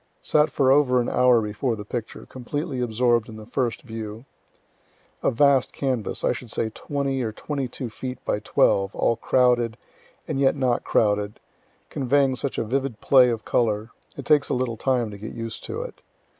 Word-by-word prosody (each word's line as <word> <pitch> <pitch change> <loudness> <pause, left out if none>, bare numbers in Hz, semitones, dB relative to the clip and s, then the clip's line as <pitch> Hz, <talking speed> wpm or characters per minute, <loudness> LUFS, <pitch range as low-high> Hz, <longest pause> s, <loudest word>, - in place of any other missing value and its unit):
Sat 150 0 +3
for 130 -2 +2
over 135 -3 +4
an 120 - 0
hour 125 -2 +4
before 105 +4 -2
the 105 -1 -8
picture, 115 0 -6
completely 135 +2 -4
absorb'd 120 -1 +1
in 110 - -9
the 110 - -10
first 120 0 -2
view. 110 -1 -7 1.0
A - - +2
vast 140 +1 +3
canvas, 130 -6 -2
I - - +3
should 125 -1 -6
say 110 +1 -2
twenty 140 +1 -2
or 110 -3 -2
twenty 140 +4 -4
two 125 +1 -6
feet 130 +3 -6
by - - 0
twelve, 100 -2 +2
all 115 - +2
crowded, 120 -1 +2 0.5
and 135 - -2
yet 135 0 +3
not 130 -3 0
crowded, 105 -1 +1 0.5
conveying 135 0 +2
such 135 +1 -3
a - - 0
vivid 130 0 -2
play 130 -2 +5
of 115 -2 -3
color, 110 -1 0 0.3
it - - -7
takes 150 -2 +3
a - - +1
little 125 -2 -1
time 120 -1 0
to 100 - -9
get 110 - -7
used 115 -1 -6
to 470 - -4
it. - - -10
125 Hz, 185 wpm, -24 LUFS, 110-135 Hz, 1.0 s, play